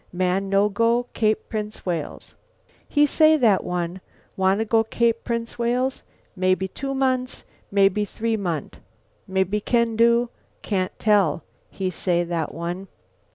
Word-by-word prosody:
Man 185 +2 0
no 195 +1 +4
go 230 +3 +2
Cape 215 -1 0
Prince 215 -1 -5
Wales.' 170 -5 -4 0.6
"He 295 0 +4
say, 310 +2 +5
that 220 -8 +3
one, 180 +1 -3 0.3
'Wanna 190 +3 +2
go 225 0 +3
Cape 230 +1 0
Prince 235 0 -4
Wales, 250 +3 0 0.3
mebby 185 0 +1
two 275 +8 -5
month, 255 -1 0 0.3
mebby 200 +1 +3
three 225 +2 -2
month. 175 -8 -4 0.5
Mebby 190 +2 0
can 235 0 +1
do. 235 +1 +4 0.3
Can't 185 -3 -2
tell,' 200 -7 +2 0.3
he 190 -1 -3
say, 175 0 0
that 170 -2 -2
one." 175 +3 -5
210 Hz, 135 wpm, -23 LUFS, 185-235 Hz, 0.6 s, say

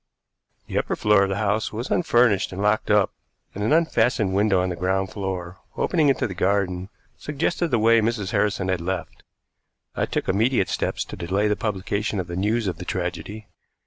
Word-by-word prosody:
The - - -1
upper - - -2
floor 105 -1 +4
of 100 - +2
the 95 - -1
house 105 +1 0
was 115 +4 -5
unfurnished 120 - +3
and 95 - -6
locked 105 +1 +1
up, 105 -1 +4 0.4
and 100 - -4
an 110 - +1
unfastened 120 - +2
window 100 -1 +3
on 90 0 0
the 90 - -3
ground 95 +2 -1
floor, 95 -3 -5 0.2
opening 160 -5 +2
into 135 - +1
the 95 - -4
garden, 95 -1 0 0.3
suggested 165 +4 -1
the 125 - +1
way 115 +1 +4
Mrs. 110 -3 -1
Harrison 100 -2 0
had 95 -2 0
left. 90 +1 -4 0.7
I - - 0
took - - -2
immediate 110 +1 +2
steps - - -2
to - - -8
delay 95 +4 0
the 105 - +1
publication 105 0 -2
of 90 - -2
the 85 0 -6
news 105 +5 0
of 90 -4 -2
the 90 - -6
tragedy. 90 +4 -4
100 Hz, 190 wpm, -23 LUFS, 95-110 Hz, 0.7 s, floor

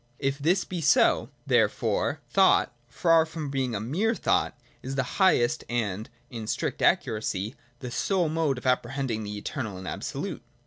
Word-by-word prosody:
If 135 +1 -1
this 175 +6 +2
be 180 -2 -4
so, 150 -1 +4 0.2
there - - +4
fore, - - -1
thought, - - +4
far 165 +6 +4
from 155 -3 -6
being 130 -4 -1
a - - -1
mere 180 - 0
thought, - - 0 0.2
is 135 +1 -5
the 135 - +1 0.2
highest 120 -10 +3
and, 110 -3 -2 0.2
in 115 -3 -6
strict - - -2
accuracy, 105 0 +1 0.3
the 125 - -5
sole 185 +5 +1
mode 155 -4 0
of 125 - -9
apprehending 125 -2 0
the 105 0 -5
eternal 105 -2 -4
and 95 0 -8
absolute. - - -4
130 Hz, 165 wpm, -27 LUFS, 110-160 Hz, 0.3 s, so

